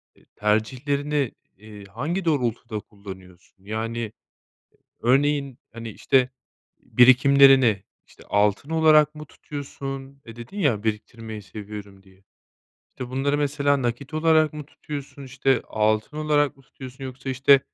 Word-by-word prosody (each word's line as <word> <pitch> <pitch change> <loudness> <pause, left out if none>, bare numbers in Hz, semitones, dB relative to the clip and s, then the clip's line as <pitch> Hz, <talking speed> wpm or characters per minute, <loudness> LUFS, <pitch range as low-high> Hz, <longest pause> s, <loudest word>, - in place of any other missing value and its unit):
eee, - - -25
tercihlerini, 135 +6 0 0.3
eee, 105 0 -12
hangi 150 - -3
doğrultuda 120 -8 -1
kullanıyorsun? 95 -3 -13
Yani, 110 +1 -3 0.9
örneğin, 140 +1 +2
hani, 115 0 -7
işte, 130 +4 +2 0.5
birikimlerini, 130 -3 +6 0.2
işte, - - -18
altın 105 +7 +1
olarak 155 -2 +5
mı 150 0 -8
tutuyorsun? 135 -2 -8
Eee, 115 -1 -11
dedin 120 - -9
ya 125 - +1
"Biriktirmeyi 110 0 -4
seviyorum." 100 -1 -9
diye. 95 0 -23 0.7
İşte, 125 -1 -8
bunları 140 +3 0
mesela 140 -1 +1
nakit 120 +5 -3
olarak 155 -1 +3
mı 150 -1 -7
tutuyorsun? 145 -1 -8
İşte, 135 -1 +1
altın 110 +5 0
olarak 150 -2 +1
mı 135 - -20
tutuyorsun? 130 +1 -11
Yoksa, 130 +1 -8
işte, 135 +1 +5
130 Hz, 120 wpm, -24 LUFS, 110-145 Hz, 0.9 s, birikimlerini